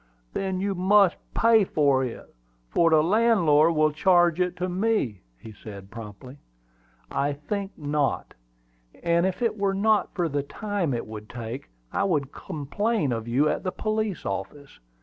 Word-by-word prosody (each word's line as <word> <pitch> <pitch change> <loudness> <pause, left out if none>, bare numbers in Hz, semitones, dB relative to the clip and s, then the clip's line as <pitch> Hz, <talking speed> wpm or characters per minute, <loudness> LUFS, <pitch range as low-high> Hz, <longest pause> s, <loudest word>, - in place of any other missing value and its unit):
"Then 190 -1 -2
you 200 +1 -1
must 190 0 +4 0.2
pay 225 -2 +5
for 140 -7 +2
it, 125 -3 -7 0.4
for 165 - +4
the 155 -1 +4
landlord 170 -6 +4
will 155 0 +3
charge 175 +1 +3
it 180 0 0
to 180 - -2
me," 185 - 0 0.4
said 100 -3 -9
he, - - -17
promptly. 115 +5 -10 0.7
"I 145 +1 0
think 195 +7 -5
not; 145 -2 -1 0.7
and 170 +1 +3
if 190 +5 -3
it 225 -2 0
were 195 -1 +1
not 215 +2 +2
for 175 -3 0
the 145 -2 -1
time 180 - -2
it 115 - -4
would 105 -1 -9
take, 120 - -7 0.2
I - - +1
would 145 -8 0
complain 160 - -2
of 115 -1 -3
you 130 +6 +2
at - - 0
the 185 - -2
police 215 -3 -2
office. 100 - -6
165 Hz, 160 wpm, -25 LUFS, 140-195 Hz, 0.7 s, pay